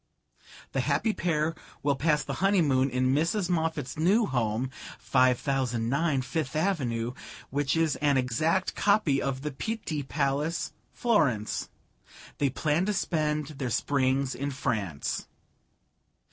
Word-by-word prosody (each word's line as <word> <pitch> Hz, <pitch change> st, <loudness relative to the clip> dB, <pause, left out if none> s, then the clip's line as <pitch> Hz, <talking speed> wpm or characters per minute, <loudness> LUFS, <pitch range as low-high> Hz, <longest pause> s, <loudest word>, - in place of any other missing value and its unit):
The -, -, -1 dB
happy 220 Hz, -, +1 dB
pair 165 Hz, -3 st, 0 dB, 0.3 s
will 140 Hz, -1 st, +2 dB
pass 150 Hz, +2 st, +2 dB
the 140 Hz, -, -4 dB
honeymoon 155 Hz, -10 st, +3 dB
in 130 Hz, +1 st, +1 dB
Mrs. 170 Hz, +5 st, +1 dB
Moffatt's 160 Hz, -5 st, -1 dB
new 200 Hz, +8 st, +4 dB
home, 120 Hz, -, -1 dB, 0.3 s
5009 130 Hz, +2 st, +1 dB
Fifth 145 Hz, +2 st, -3 dB
Avenue, 125 Hz, -10 st, 0 dB, 0.4 s
which 145 Hz, +2 st, 0 dB
is 165 Hz, -2 st, +2 dB
an 145 Hz, -2 st, +2 dB
exact 155 Hz, +9 st, +1 dB
copy 200 Hz, -10 st, +3 dB
of 135 Hz, 0 st, -2 dB
the 150 Hz, -, -2 dB
Pitti 160 Hz, -1 st, -3 dB
Palace, 140 Hz, +3 st, -1 dB, 0.2 s
Florence. 145 Hz, -, +1 dB, 0.7 s
They 140 Hz, -, +3 dB
plan 155 Hz, +7 st, 0 dB
to 210 Hz, -, +1 dB
spend 155 Hz, -5 st, 0 dB
their 130 Hz, -3 st, -1 dB
springs 135 Hz, +2 st, +1 dB
in 140 Hz, +2 st, -3 dB
France.'" 110 Hz, -, -2 dB
145 Hz, 120 wpm, -28 LUFS, 130-165 Hz, 0.7 s, new